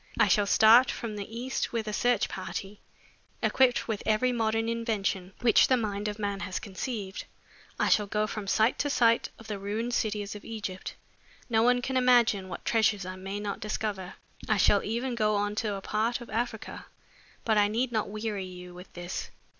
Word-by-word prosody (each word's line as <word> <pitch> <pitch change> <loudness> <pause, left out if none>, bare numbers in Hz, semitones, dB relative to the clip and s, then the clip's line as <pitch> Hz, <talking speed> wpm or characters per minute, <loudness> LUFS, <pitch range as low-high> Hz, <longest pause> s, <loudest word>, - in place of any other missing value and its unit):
I - - +5
shall 205 -2 +3
start 225 +5 +7
for 235 - -4
the 205 -1 -6
East 260 +2 -2
with 225 -2 -2
a 210 - -3
search 245 +3 +2
party, 195 +1 -6 0.6
equipped 255 -2 +3
with 220 -3 -2
every 225 +4 +2
modern 225 -1 0
invention 210 -5 -2
which 230 -3 +5
the 255 - +4
mind 210 -2 -2
of 210 0 -3
man 200 -2 -2
has 185 -2 -4
conceived. 200 -1 -5 0.5
I - - +2
shall 210 -1 +3
go 210 +1 0
from 215 -2 -5
site 220 +4 +2
to 290 - 0
site 230 -4 +3
of 225 - -14
the 210 -2 -5
ruined 215 +5 -3
cities 210 -3 -1
of 210 - -10
Egypt. 205 -5 -6 0.6
No 220 -1 +4
one 245 +1 +3
can 260 +1 -1
imagine 240 -6 +4
what 175 - -7
treasures 215 -4 +2
I 185 0 -5
may 195 +2 -5
not 205 0 -4
discover. 210 -4 -4 0.3
I 215 - +3
shall 200 0 +4
even 240 +4 -2
go 215 -2 +1
on 205 0 0
to 215 -3 -1
a 195 - -6
part 220 +4 -1
of 240 - -11
Africa 225 0 -4 0.6
but 220 -2 +3
I 205 - +4
need 235 +4 -1
not 215 -3 -1
weary 210 -2 -3
you 180 -1 -10
with 180 +1 -12
this. 175 +1 -5
215 Hz, 195 wpm, -28 LUFS, 200-230 Hz, 0.6 s, start